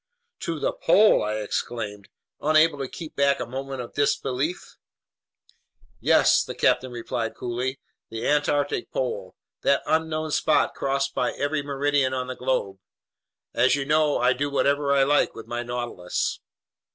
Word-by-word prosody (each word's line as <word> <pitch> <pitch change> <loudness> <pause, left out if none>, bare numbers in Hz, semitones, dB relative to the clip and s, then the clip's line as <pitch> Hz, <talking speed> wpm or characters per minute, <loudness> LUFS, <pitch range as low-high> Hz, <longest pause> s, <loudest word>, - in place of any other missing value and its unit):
"To 165 -2 -3
the - - 0
pole!" 210 +6 +4
I 105 0 -1
exclaimed, 105 -1 -4 0.3
unable 155 0 +4
to 135 - -3
keep 160 +4 -9
back 140 0 +2
a - - -2
movement 135 +2 -5
of 120 - -9
disbelief. 145 +3 -1 1.2
"Yes," - - +4
the - - -7
captain 130 0 +2
replied 115 -1 -4
coolly, 125 +2 -3 0.3
"the 115 +1 -4
Antarctic 150 - +1
pole, - - -3 0.3
that - - +2
unknown 155 -1 0
spot 155 - +2
crossed 135 0 -1
by - - 0
every 145 +1 -1
meridian 140 -1 0
on 130 -1 -2
the 130 0 -6
globe. 125 -7 -2 0.7
As 125 +3 +4
you 140 -1 -2
know, 150 0 +2
I 125 +1 +3
do 145 +3 -2
whatever 140 0 +1
I 140 -1 +4
like 145 +2 +2
with 115 - -9
my 120 0 -3
Nautilus." 120 -7 -3
135 Hz, 150 wpm, -25 LUFS, 125-150 Hz, 1.2 s, pole